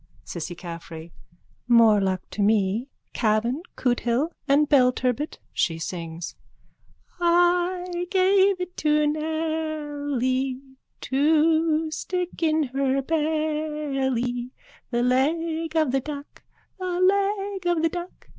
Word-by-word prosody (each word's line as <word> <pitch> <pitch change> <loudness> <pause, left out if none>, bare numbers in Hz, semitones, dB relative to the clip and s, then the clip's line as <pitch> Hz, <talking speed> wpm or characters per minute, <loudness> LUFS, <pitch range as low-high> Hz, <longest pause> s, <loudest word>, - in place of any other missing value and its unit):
CISSY 175 +1 -6
CAFFREY: 170 -1 -9 0.6
More 230 -4 +6
luck 185 -1 -1
to 210 - -3
me. 210 +4 +2 0.2
Cavan, 230 +5 +1
Cootehill 245 +4 0 0.2
and 290 +2 +4
Belturbet. 255 0 +2 0.2
(She 165 -4 0
sings.) 165 0 -6 0.8
I 350 +1 +2
gave 385 0 +4
it 360 0 -5
to 300 0 +2
Nelly 295 -4 -1 0.4
To 315 +2 +2
stick 360 +2 -4
in 315 -1 +2
her 270 0 0
belly, 300 -5 -1 0.4
The 240 0 0
leg 320 +5 0
of 310 -5 +2
the 270 - +2
duck, 285 +1 -8 0.4
The 365 -1 -2
leg 395 0 +1
of 330 -2 0
the 330 - +3
duck. 350 +2 -8
300 Hz, 105 wpm, -25 LUFS, 245-330 Hz, 0.8 s, More